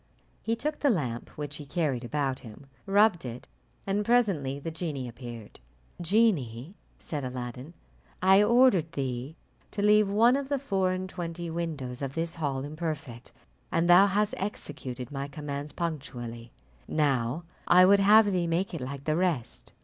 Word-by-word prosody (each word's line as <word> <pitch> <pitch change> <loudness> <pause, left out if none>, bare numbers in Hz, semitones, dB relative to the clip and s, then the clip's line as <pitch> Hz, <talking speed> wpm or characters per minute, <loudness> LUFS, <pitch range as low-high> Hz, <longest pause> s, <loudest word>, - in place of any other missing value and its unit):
He 225 - 0
took 300 +5 -3
the 285 - +3
lamp, 130 - -1
which 145 0 -4
he 150 - -8
carried 140 -6 -1
about 135 +1 -1
him, 115 +4 -12 0.2
rubbed 200 -2 +4
it, 125 -1 -7 0.4
and 200 +1 0
presently 195 - +2
the 155 +3 -5
genie 155 -6 -4
appeared. 120 -2 -9 0.4
"Genie," 170 - +1 0.2
said 150 -3 -5
Aladdin, 125 +4 -6 0.4
"I 190 +2 +6
ordered 210 -8 +4
thee 135 0 -3 0.3
to 205 - -3
leave 210 -1 +5
one 230 +5 +5
of 275 -1 -3
the 285 - +1
four 195 -9 0
and 185 0 -3
twenty 170 -2 -5
windows 150 -7 -4
of 135 -1 -4
this 165 0 -2
hall 140 -5 -2
imperfect, 145 -5 -5 0.4
and 165 +1 +2
thou 180 +3 +8
hast 205 +2 +1
executed 135 - -6
my 140 -1 -4
commands 145 0 -5
punctually; 120 -8 -5 0.4
now 140 0 0 0.2
I 180 +1 +7
would 200 +2 +6
have 205 +1 +6
thee 180 -2 0
make 175 +4 -1
it 165 - -4
like 140 +2 -6
the 155 +1 0
rest." 170 -9 -2
160 Hz, 155 wpm, -28 LUFS, 135-195 Hz, 0.4 s, thou